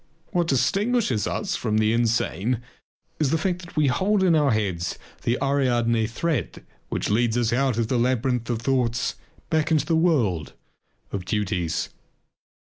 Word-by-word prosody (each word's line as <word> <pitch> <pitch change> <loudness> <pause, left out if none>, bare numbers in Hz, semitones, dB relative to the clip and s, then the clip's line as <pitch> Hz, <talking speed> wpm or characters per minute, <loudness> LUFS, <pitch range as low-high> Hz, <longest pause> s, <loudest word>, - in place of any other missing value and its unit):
What 175 -2 +1
distinguishes 195 - +1
us - - -2
from 110 -1 -1
the 110 0 +3
insane 115 -1 +1 0.6
is 150 -3 +2
the 160 - +2
fact 180 +2 -1
that 175 - -12
we 155 - +4
hold 190 +10 +2
in 180 -3 +4
our 150 -2 +3
hands 95 -6 -1 0.2
the 120 +2 0
Ariadne 120 -5 +1
thread 125 - -3 0.2
which - - -2
leads 115 +2 +2
us 115 -1 +1
out 130 -2 +1
of 115 -2 +1
the 125 +1 +1
labyrinth 125 -1 0
of 115 -1 -2
thoughts 125 -2 +1 0.4
back 160 0 +2
into 155 -3 +2
the 165 - +1
world 120 - +1 0.6
of 100 - -3
duties. 90 -5 -1
125 Hz, 155 wpm, -24 LUFS, 110-155 Hz, 0.6 s, we